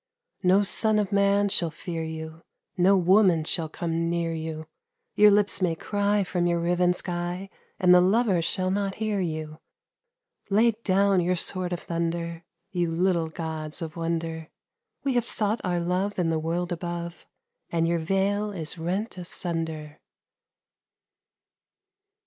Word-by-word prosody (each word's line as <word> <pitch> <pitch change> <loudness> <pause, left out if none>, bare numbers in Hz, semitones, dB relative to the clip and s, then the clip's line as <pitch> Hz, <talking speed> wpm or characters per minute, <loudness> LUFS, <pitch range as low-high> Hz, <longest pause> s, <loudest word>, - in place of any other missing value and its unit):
No 190 +2 +4
son 215 +2 +2
of 205 -3 0
man 200 0 +3
shall 175 -4 +1
fear 165 +1 -5
you, 160 0 -7 0.3
No 190 +2 +4
woman 185 -2 +4
shall 160 0 0
come 165 0 -2
near 170 -1 -1
you, 160 -1 -5 0.5
Your 210 0 +7
lips 205 -1 +2
may 175 -3 +1
cry 205 +3 0
from 180 -1 -1
your 170 0 +1
riven 175 +1 +2
sky, 180 +2 -4 0.3
And 180 -1 +6
the 180 - +7
lovers 190 -2 +3
shall 185 +2 0
not 195 0 -1
hear 215 -2 -1
you. 155 -3 -4 0.9
Lay 220 +4 +4
down 200 -3 +2
your 180 +1 +1
sword 180 +1 -3
of 175 - -3
thunder, 170 0 -3 0.3
You 175 -2 0
little 170 -1 +1
gods 160 -1 -5
of 165 -2 -6
wonder! 165 -1 -3 0.5
We 275 -2 0
have 240 -2 +1
sought 215 -1 +1
our 180 -2 0
love 185 +4 -1
in 170 -3 +1
the 160 - 0
world 170 +3 -2
above, 170 0 -5 0.4
And 165 -1 +1
your 170 0 +1
veil 195 +5 0
is 165 -3 -4
rent 185 +5 -3
asunder. 165 -3 -4
175 Hz, 145 wpm, -26 LUFS, 165-195 Hz, 0.9 s, Your